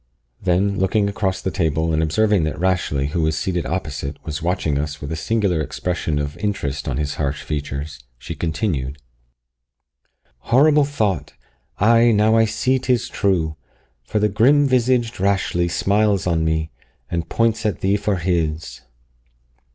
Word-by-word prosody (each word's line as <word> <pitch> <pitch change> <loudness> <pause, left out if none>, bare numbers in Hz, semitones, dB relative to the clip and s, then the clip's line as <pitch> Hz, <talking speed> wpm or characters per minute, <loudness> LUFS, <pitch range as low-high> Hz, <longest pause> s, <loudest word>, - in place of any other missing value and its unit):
Then, 95 +2 +1
looking 100 +2 +2
across 95 -2 -1
the 95 - -2
table, 80 -1 0
and 80 - +2
observing 105 +4 +2
that 80 - -3
Rashleigh, 85 -6 0
who 85 - 0
was 80 0 +1
seated 90 -1 -2
opposite, 75 -5 -4
was 80 -1 -4
watching 85 -4 0
us 75 0 -4
with 70 +1 -6
a - - -1
singular 95 0 0
expression 80 0 -2
of 75 0 -3
interest 75 -9 -3
on 70 -3 -2
his 75 -1 -2
harsh 70 0 -2
features, 75 0 -4 0.2
she - - -7
continued 75 -5 -2 1.4
"Horrible 145 - +4
thought! 105 - -1 0.4
Ay, 115 +3 +5
now 110 +1 +4
I 115 0 +5
see 115 +4 0
'tis 125 -2 0
true, 85 -6 0 0.4
For - - -3
the 105 0 +3
grim 130 +8 +4
visaged 125 -3 +1
Rashleigh 95 -3 +1
smiles 100 +3 +1
on 85 -3 +1
me, 80 0 -1 0.4
And 85 -1 -2
points 115 -1 +1
at 105 -3 -1
thee 100 +1 +2
for 105 0 0
his! 80 -3 -2
90 Hz, 150 wpm, -21 LUFS, 80-105 Hz, 1.4 s, Ay